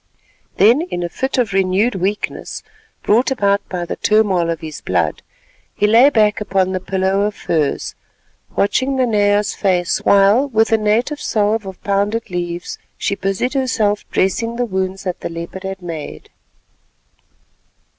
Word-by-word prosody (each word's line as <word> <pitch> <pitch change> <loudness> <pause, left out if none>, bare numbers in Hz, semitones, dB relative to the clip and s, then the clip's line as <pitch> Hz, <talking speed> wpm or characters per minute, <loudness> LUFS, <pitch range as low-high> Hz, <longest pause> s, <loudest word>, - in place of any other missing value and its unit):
Then, 235 +9 +5
in 255 - -4
a 175 - -3
fit 265 +10 -3
of 230 -6 0
renewed 195 +5 +2
weakness, 195 +3 -3 0.4
brought 230 +5 +3
about 200 -6 +1
by 180 -2 -3
the - - -4
turmoil 200 -6 +2
of 165 -2 -3
his 155 -2 -7
blood, 85 -4 -1 0.5
he - - +1
lay 230 +6 +6
back 215 -5 +2
upon 190 -2 0
the 185 - -1
pillow 190 +1 0
of 210 0 -1
furs, 155 -4 -1 0.6
watching 260 +7 +1
Nanea's 210 -5 +2
face 180 -3 0
while 200 +7 +4
with 225 -4 +1
a 225 - +5
native 230 +8 0
salve 210 -1 0
of 190 -1 -8
pounded 200 +2 -1
leaves 175 -1 -4 0.2
she - - -1
busied 195 +6 -2
herself 225 -6 0
dressing 230 +5 0
the 245 +1 0
wounds 190 -2 -3
that 180 -2 -3
the - - -5
leopard 170 +3 -7
had 190 -1 -6
made. 165 -3 -7
200 Hz, 150 wpm, -18 LUFS, 185-225 Hz, 0.6 s, lay